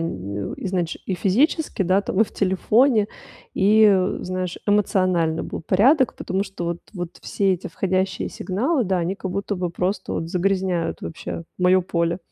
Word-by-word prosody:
изнач 165 - -3
и 190 - -2
физически, 230 - +1
да, 185 +2 +3
там, 200 0 -2
и 225 - +7
в - - -16
телефоне, 210 +4 +3 0.4
и, 210 +3 +4
э, 185 -1 +1
знаешь, 185 -1 -3
эмоционально 185 -5 +2
был - - -5
порядок, 250 - +3
потому 190 +1 -2
что 195 -3 -6
вот 170 0 -2 0.2
вот 175 -2 -6
все 195 -2 +1
эти 180 - -4
входящие 190 0 -1
сигналы, 245 - -1
да, 190 -1 0
они 175 +2 -1
как 190 -1 -5
будто 200 +2 -2
бы 180 -2 -2
просто 185 +2 -2
вот 165 - -3
загрязняют 185 -2 0
вообще 165 +1 -6 0.2
моё 185 +1 +4
поле. 170 0 -1
185 Hz, 160 wpm, -22 LUFS, 175-200 Hz, 0.4 s, и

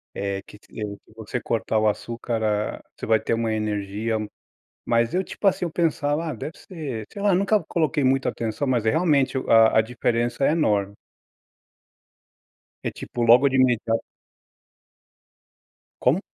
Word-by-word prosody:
É 100 -1 -2
que 105 - -15
ti - - -25
eh, 105 -1 -4
que - - -21
você 115 +2 -4
cortar 115 -1 -1
o 110 0 +3
açúcar, 115 +2 -2
ah, 105 0 -1
você - - -6
vai 110 -1 +3
ter 115 - -1
uma 115 -1 -1
energia, 105 +1 -2 0.7
mas 115 0 +1
eu, 185 +1 +1
tipo 205 - -7
assim, 190 - +2
eu 170 - -4
pensava: 155 -2 0
"Ah, 160 - -3
deve 155 - -7
ser", 140 - -6
sei 200 - -6
lá, 200 -2 +3
nunca 200 +3 +2
coloquei 155 -3 0
muita 135 +1 +2
atenção, 115 +5 -3
mas 125 -4 +1
é - - +6
realmente 145 -3 +2
a 115 -1 +6
a - - +7
diferença 120 +2 -1
é 135 - +4
enorme. 100 -11 +1 1.9
É - - -2
tipo, 120 - -6
logo 120 +4 +6
de 135 - -2
imediato 120 -3 +2 2.0
Como? 140 +8 +3
120 Hz, 160 wpm, -24 LUFS, 110-145 Hz, 2.0 s, a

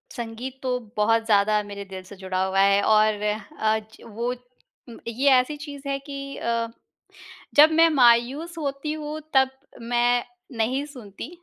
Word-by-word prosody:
संगीत 240 +3 -6
तो 250 -1 0 0.2
बहुत 225 +2 +2
ज़्यादा 210 -1 +3
मेरे 200 0 -7
दिल 190 -1 -9
से 195 +2 -12
जुड़ा 185 0 -2
हुआ 190 0 0
है 200 0 +4
और 215 -1 +3 0.4
आज, 220 0 -1
वो 235 +3 -3 0.7
ये 255 +5 +2
ऐसी 260 +3 +3
चीज़ 285 -1 -9
है 275 0 -1
कि 275 0 -7
अ, 230 0 -1 0.9
जब 305 +2 +8
मैं 330 +1 +5
मायूस 270 +5 +3
होती 285 -1 -3
हूँ 305 0 -5
तब 265 -1 +5 0.3
मैं 240 +1 +1 0.3
नहीं 250 +5 0
सुनती। 250 -6 -10
240 Hz, 145 wpm, -24 LUFS, 215-275 Hz, 0.9 s, जब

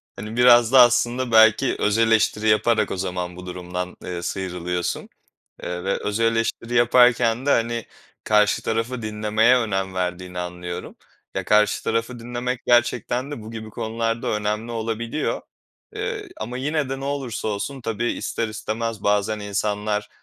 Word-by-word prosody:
Hani, 105 +3 -7
biraz 120 -1 +6
da 135 - +7
aslında 120 +1 +3
belki 110 +3 +5
öz 105 +1 +2
eleştiri 110 -1 +2
yaparak 110 0 +2
o - - -3
zaman 90 -1 -3
bu 90 0 -10
durumdan, 90 0 -5
eee, 90 -1 -4
sıyrılıyorsun, 90 -1 -3 0.5
eee, 90 0 -4
ve 95 - 0
öz 105 +2 -3
eleştiri 115 +1 0
yaparken 120 0 +4
de, - - +3
hani, 115 -2 +1 0.4
karşı 105 -3 +3
tarafı 115 +2 -2
dinlemeye 110 +3 +2
önem 95 -5 -1
verdiğini 90 0 -3
anlıyorum. 90 0 -6 0.4
Ya, - - -2
karşı 105 0 +3
tarafı 115 +2 -1
dinlemek 120 +1 -3
gerçekten 120 +2 +2
de 145 -7 -6
bu 110 - -9
gibi 110 -1 -7
konularda 115 +1 -2
önemli 105 +2 -2
olabiliyor, 115 +4 -2 0.5
eee, 425 -1 -4
ama 125 +1 -4
yine 150 +1 -1
de 135 0 -4
ne - - -5
olursa 135 -6 -3
olsun 110 +7 -4
tabii 115 0 -1
ister 115 - -3
istemez 110 0 -4
bazen 105 +1 +1
insanlar 105 +1 -2
110 Hz, 150 wpm, -23 LUFS, 105-120 Hz, 0.5 s, da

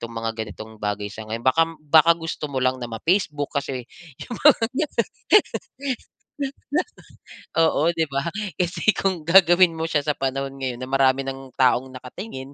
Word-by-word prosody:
itong 115 0 -7
mga 115 0 -2
ganitong 110 +1 -11
bagay 105 0 -2
sa 110 0 -9
ngayon. 115 +2 -5
Baka 130 +5 +4 0.2
baka 160 +2 +6
gusto 165 -2 -5
mo 135 - -6
lang 130 0 +1
na 120 - -4
ma-Facebook 150 - 0
kasi 130 -3 -5 0.9
di 315 +3 +1
ba, - - 0 2.6
Oo, 160 0 +3
'di 165 -1 +1
ba? 140 +2 -1 0.3
Kasi 175 +3 0
kung 190 -4 0
gagawin 175 -1 +6
mo 160 - -2
siya 155 -3 +1
sa 150 -1 0
panahon 135 0 -2
ngayon 130 -2 -4
na 130 - -6
marami 135 0 +3
ng 135 -1 -7
taong 130 0 +2
nakatingin, 130 - -8
135 Hz, 155 wpm, -23 LUFS, 125-165 Hz, 2.6 s, baka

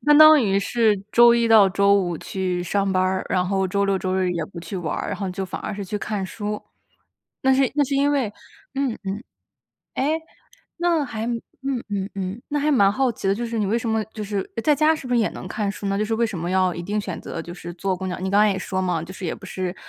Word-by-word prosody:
相 295 0 +7
当 310 -2 +9
于 195 -3 +2
是 215 0 +2
周 235 0 +7
一 235 -1 +2
到 215 -3 +7
周 200 +1 +3
五 180 -4 +1
去 185 -2 -2
上 195 +2 0
班 185 -1 +2
儿， 185 0 0
然 180 -1 +1
后 190 0 +1
周 200 +2 0
六 195 -1 +1
周 185 0 -2
日 185 -1 +1
也 170 -2 -2
不 170 - -11
去 170 +4 -6
玩 165 -4 -3
儿， - - -3
然 - - -3
后 195 -2 -3
就 190 +1 -3
反 185 - -6
而 - - -4
是 200 0 -5
去 210 - -3
看 205 -1 -3
书。 210 +2 -4 0.8
那 265 0 +4
是 265 -1 +3
那 290 -1 +3
是 275 - -2
因 280 +1 +3
为 265 -8 0 0.4
嗯 270 -4 -1
嗯， 195 +1 -2 0.8
诶， 310 +4 0 0.6
那 340 -3 +2
还 225 -4 -4
嗯 245 +2 -4
嗯 200 -1 -2
嗯， 195 +3 -4
那 295 - -1
还 295 +1 +1
蛮 200 -8 +5
好 260 +4 +1
奇 205 - -6
的， 195 - +3
就 240 - -3
是 230 -1 -3
你 210 - +1
为 210 +4 +1
什 235 - -5
么 220 0 +1
就 215 - -5
是 205 0 -2 0.2
诶， 230 - -2
在 300 - +4
家 310 +2 +4
是 290 -4 -7
不 250 - -3
是 245 - +4
也 220 - +2
能 - - -8
看 205 +2 -2
书 200 - -6
呢， 195 0 0
就 215 - +1
是 225 +1 -1
为 230 +1 +2
什 220 -6 -3
么 170 +2 -3
要 185 -1 +2
一 170 - -5
定 205 +4 -2
选 185 -4 -5
择 165 - -6
就 170 - -8
是 175 -1 -8
坐 190 +2 -1
公 190 +1 -4
交 180 - -3
你 190 +1 -3
刚 200 +1 +4
才 210 0 +5
也 190 - -1
说 185 0 -2
嘛， 180 -3 0
就 170 +3 -8
是 185 -1 -6
也 - - -2
不 - - -13
是 185 -1 -4
200 Hz, 295 characters per minute, -23 LUFS, 185-235 Hz, 0.8 s, 当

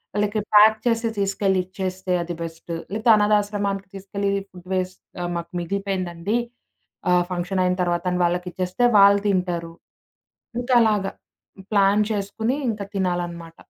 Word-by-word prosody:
ఆళ్ళకి 210 +1 0 0.2
ప్యాక్ 215 +1 +8
చేసి, 230 -1 +1
తీసుకెళ్ళి 195 -1 +1
ఇచ్చేస్తే, 185 0 -4
అది 175 0 -5
బెస్ట్. 165 +1 -7 0.2
లేతే 220 +2 +1
అనాధాశ్రమానికి 205 -2 +1
తీసుకెళ్లి, 200 +1 -3 0.2
ఫుడ్ 180 -1 -14
వేస్ట్ 185 0 -2 0.2
"ఆహ్, 175 0 -2
మాకు 170 - -6
మిగిలిపోయిందండి, 190 +1 -2 0.8
ఆహ్, 180 0 +4
ఫంక్షనయిన 180 +1 0
తర్వాత" 175 0 0
అని 180 - -1
వాళ్ళకిచ్చేస్తే, 180 +4 -1
వాళ్ళు 200 0 +7
తింటారు. 175 -3 -1 0.9
ఇంకలాగ 230 -5 +3 0.7
ప్లాన్ 200 0 +4
చేసుకోని, 220 +5 -2
ఇంక 215 -2 -5 0.2
తినాలన్నమాట. 175 -3 -2
195 Hz, 120 wpm, -23 LUFS, 180-205 Hz, 0.9 s, ప్యాక్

